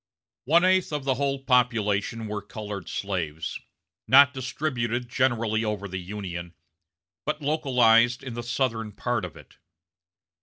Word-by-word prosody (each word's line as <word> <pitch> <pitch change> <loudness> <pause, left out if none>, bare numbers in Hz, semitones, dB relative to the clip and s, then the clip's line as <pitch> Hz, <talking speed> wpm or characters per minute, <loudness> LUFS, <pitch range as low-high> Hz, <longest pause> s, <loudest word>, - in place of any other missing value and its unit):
"One 170 +6 +4
eighth 185 -2 +3
of 150 -2 -2
the 135 -1 +1
whole 135 0 -2
population 115 -4 +1
were 105 -1 -4
colored 105 -2 -7
slaves, 85 -6 -3 0.5
not 140 +2 +7
distributed 125 -3 -2
generally 115 -4 +1
over 105 -2 -3
the 95 0 -5
Union, 90 -3 -6 0.7
but 150 +1 -2
localized 125 -5 +3
in 130 -3 -6
the 120 - -4
Southern 115 -3 -2
part 120 0 -2
of 90 -4 -7
it. - - -17
120 Hz, 130 wpm, -26 LUFS, 105-130 Hz, 0.7 s, not